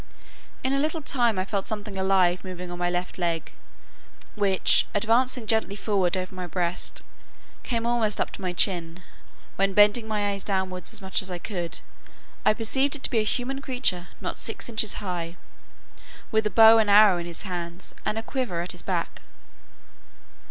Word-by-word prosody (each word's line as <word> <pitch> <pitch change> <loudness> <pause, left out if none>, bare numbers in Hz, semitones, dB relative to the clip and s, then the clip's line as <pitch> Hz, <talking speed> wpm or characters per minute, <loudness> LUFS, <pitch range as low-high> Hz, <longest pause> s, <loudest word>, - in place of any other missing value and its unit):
In 260 +1 +1
a 275 - +1
little 310 +2 -1
time 240 -6 +1
I 185 - 0
felt 200 -1 -2
something 210 -2 -4
alive 190 -2 +2
moving 180 -1 -7
on 175 - -7
my 175 0 +1
left 180 +2 -3
leg, 170 -2 -2 0.8
which 200 -3 +3
advancing 230 +3 +2
gently 220 -2 0
forward 195 -3 0
over 185 0 -4
my 185 -1 -5
breast, 175 0 -3 0.6
came 230 -2 -2
almost 235 -3 +1
up - - 0
to - - -9
my 185 -1 -2
chin; 175 -1 0 0.5
when, 195 0 +1
bending 210 +2 +5
my 205 -2 0
eyes 200 -1 -4
downwards 190 -3 -2
as - - -5
much 190 - +1
as 190 - -4
I 180 - -4
could, 175 -2 -5 0.6
I 215 - +4
perceived 265 +6 +1
it 280 - -9
to - - -1
be 235 - +2
a - - +2
human 255 +5 -2
creature 250 -10 0
not - - -4
six - - -2
inches 220 -2 +1
high, 175 -2 -4 0.9
with 220 -1 +2
a - - -1
bow 225 +2 +7
and 215 -2 +2
arrow 205 -3 +7
in 170 - -5
his 170 - -4
hands, 175 -2 -5
and 215 - -2
a 225 - -2
quiver 240 -10 -2
at 175 - -3
his - - -5
back. - - -3
200 Hz, 180 wpm, -25 LUFS, 180-225 Hz, 0.9 s, bow